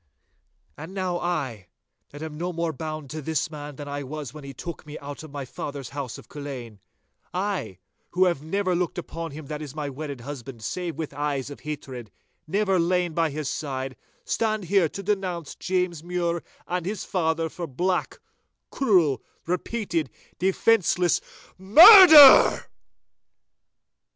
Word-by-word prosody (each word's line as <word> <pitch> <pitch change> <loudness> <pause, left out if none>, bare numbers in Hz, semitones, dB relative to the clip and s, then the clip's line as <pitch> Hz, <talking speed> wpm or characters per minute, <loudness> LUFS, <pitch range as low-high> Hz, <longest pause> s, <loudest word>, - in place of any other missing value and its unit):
'And 165 +6 -9
now 185 -2 -2
I, 135 - -3 0.4
that 145 +2 -9
am 155 -1 -6
no 175 +4 -3
more 170 -1 -2
bound 155 -1 -6
to 155 0 -5
this 160 +3 -2
man 145 -1 -8
than 145 +1 -8
I 145 0 -4
was 145 -2 -7
when 150 -1 -10
he 140 - -8
took 170 +6 -8
me 150 0 -9
out 145 0 -8
of 155 - -10
my 140 -1 -6
father's 140 +1 -7
house 140 -4 -6
of - - -14
Culzean—I, 140 - -7 0.3
who 185 +2 +2
have 170 -6 0
never 185 +4 -1
looked 175 0 -1
upon 165 -1 -5
him 145 +1 -9
that 150 +1 -6
is 150 -2 -8
my 145 -2 -4
wedded 140 -2 -7
husband 130 -3 -8
save 170 - -4
with 155 -3 -5
eyes 145 -1 -3
of 145 - -9
hatred, 135 -6 -7 0.4
never 195 +1 +1
lain 175 0 +1
by 165 0 +1
his 150 0 -4
side, 135 -3 -4 0.3
stand 215 -2 -1
here 180 -2 +2
to 195 - -7
denounce 185 -6 -2
James 180 -3 -2
Mure 170 -1 -2 0.3
and 180 -1 -2
his 205 -1 -4
father 165 -2 0
for 170 +1 -6
black, 180 +7 -1 0.5
cruel, 175 - +2 0.2
repeated, 175 - -2 0.3
defenceless 185 -1 +2 0.4
MURDER! 310 - +9
160 Hz, 150 wpm, -25 LUFS, 145-180 Hz, 0.5 s, MURDER